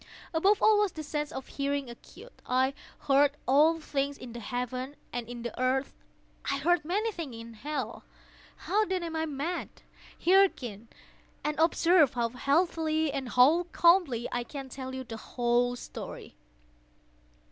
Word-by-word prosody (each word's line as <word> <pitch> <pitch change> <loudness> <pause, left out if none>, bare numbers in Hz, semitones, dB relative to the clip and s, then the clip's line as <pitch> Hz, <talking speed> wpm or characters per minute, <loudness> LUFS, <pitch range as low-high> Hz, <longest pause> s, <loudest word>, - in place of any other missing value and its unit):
Above 390 +6 +3
all 435 -1 +6
was 415 -3 +2
the 310 - -6
sense 295 0 -3
of 265 - -6
hearing 280 -1 -2
acute. 240 - -13
I 260 +2 +2 0.3
heard 285 +1 +3
all 305 +5 +5
things 280 -2 -2
in 240 -2 -9
the 240 - -6
heaven 250 +4 -4 0.2
and 240 -1 -4
in 240 -1 -7
the 235 - -5
earth. 260 +2 +1 0.6
I 275 - +1
heard 345 +5 +2
many 410 +8 0
things 320 - -6
in 230 0 -9
hell. 260 0 -5 0.6
How, 415 +4 +2
then, 375 -3 -2
am 330 -1 -4
I 320 0 -1
mad? 305 +5 -3 0.6
Hearken! 270 - +3 0.6
and 300 0 -2
observe 330 -3 +4
how 235 -1 +1
healthily—how 310 +1 +2
calmly 335 -9 +4
I 245 - -1
can 270 +2 -8
tell 260 0 -6
you 260 - -4
the 230 -2 -7
whole 245 +1 0
story. - - -8
280 Hz, 145 wpm, -29 LUFS, 250-330 Hz, 0.6 s, all